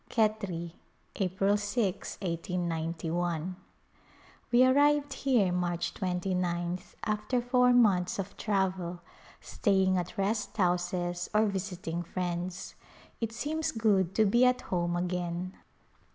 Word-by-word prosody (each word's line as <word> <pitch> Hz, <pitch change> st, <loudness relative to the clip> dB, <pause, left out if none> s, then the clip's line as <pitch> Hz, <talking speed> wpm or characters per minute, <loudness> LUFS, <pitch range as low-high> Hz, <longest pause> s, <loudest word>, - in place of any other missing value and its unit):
Khetri^ 200 Hz, -7 st, 0 dB, 0.5 s
April 195 Hz, +1 st, +1 dB
6^ 205 Hz, -1 st, 0 dB, 0.2 s
l8gi. 170 Hz, -1 st, -2 dB, 1.0 s
We 250 Hz, +1 st, +6 dB
arrived 290 Hz, +1 st, +4 dB
here 245 Hz, -9 st, +2 dB
March 175 Hz, -1 st, -1 dB
29th 180 Hz, -1 st, -2 dB
after 215 Hz, +4 st, 0 dB
four 250 Hz, +1 st, +3 dB
months 200 Hz, -8 st, +3 dB
of 195 Hz, 0 st, -5 dB
travel, 185 Hz, -4 st, -1 dB, 0.4 s
staying 190 Hz, -3 st, +2 dB
at 175 Hz, 0 st, -6 dB
rest 210 Hz, +3 st, -1 dB
houses 175 Hz, -1 st, 0 dB
or 215 Hz, +1 st, +5 dB
visiting 180 Hz, -4 st, -3 dB
friends. 175 Hz, +1 st, -4 dB, 0.5 s
It 230 Hz, -1 st, -2 dB
seems 300 Hz, +8 st, -2 dB
good 200 Hz, -5 st, +2 dB
to 220 Hz, -, +4 dB
be 235 Hz, +5 st, +4 dB
at 250 Hz, 0 st, +4 dB
home 175 Hz, -1 st, -1 dB
again. 180 Hz, 0 st, -2 dB
185 Hz, 110 wpm, -30 LUFS, 175-215 Hz, 1.0 s, We